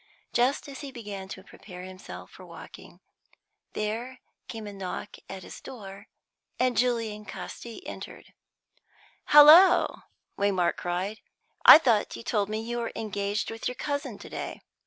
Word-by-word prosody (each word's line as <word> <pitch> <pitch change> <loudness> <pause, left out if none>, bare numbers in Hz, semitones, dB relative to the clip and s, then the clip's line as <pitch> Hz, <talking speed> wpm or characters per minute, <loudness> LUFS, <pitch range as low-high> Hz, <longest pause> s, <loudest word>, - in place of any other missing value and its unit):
Just 255 +5 +1
as 275 -2 -8
he 280 -2 -7
began 205 -6 -7
to 190 0 -9
prepare 180 -2 -12
himself 185 0 -10
for - - -14
walking, - - -13 0.7
there 230 +5 -3 0.3
came 225 -2 -7
a 205 - -7
knock 195 +1 -6
at 190 -1 -7
his - - -10
door, 200 -4 -10 0.5
and 255 -1 +2
Julian 230 -3 0
Casti 215 - -9
entered. - - -9 0.9
"Halloa!" 330 +5 +7 0.3
Waymark 195 -3 +1
cried. 185 +5 -3 0.5
"I - - +13
thought 235 -10 +1
you - - -9
told 210 -3 0
me 215 0 -2
you 240 +1 -3
were 230 - -3
engaged 205 0 -2
with 225 +1 -4
your 250 - -3
cousin 285 -5 -4
to - - -11
day." - - -6
215 Hz, 145 wpm, -27 LUFS, 200-250 Hz, 0.9 s, I